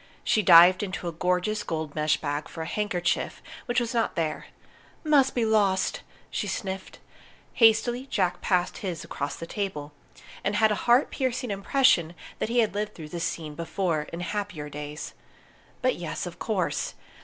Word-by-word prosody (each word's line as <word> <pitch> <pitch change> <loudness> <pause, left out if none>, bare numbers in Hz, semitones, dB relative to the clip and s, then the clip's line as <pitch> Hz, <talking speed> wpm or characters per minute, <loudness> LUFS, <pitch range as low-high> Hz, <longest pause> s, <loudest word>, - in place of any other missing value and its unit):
She 215 - +3
dived 180 0 +8
into 190 -3 -4
a - - -1
gorgeous 180 +5 0
gold 160 -5 -4
mesh 150 0 +2
bag 145 0 -3
for 160 - -6
a - - -6
handkerchief, 180 -2 -1 0.3
which 245 0 +2
was 235 0 -2
not 230 -1 0
there. 160 -2 -2 0.6
"Must 285 -4 +4
be 240 -2 +2
lost!" 205 -4 +2 0.3
she - - -2
sniffed. 190 -3 -4 0.6
Hastily 240 +2 +4
Jack 185 -8 0
passed 180 -2 0
his 180 -5 -4
across 140 0 -4
the 165 - -7
table, 165 -7 -4 0.5
and 205 - 0
had 220 0 +4
a 210 - -2
heart 245 +4 +5
piercing 255 -3 -2
impression 200 - +3 0.2
that - - -1
he 240 +1 +3
had 220 - 0
lived 210 +1 -3
through 155 -2 -9
this 170 +1 -4
scene 160 -3 -4
before, 165 -1 -2
in 170 - -5
happier 200 -6 -4
days. 150 +1 -7 0.7
But - - +2
yes, - - -4
of - - -8
course! - - -1
190 Hz, 165 wpm, -27 LUFS, 165-220 Hz, 0.7 s, dived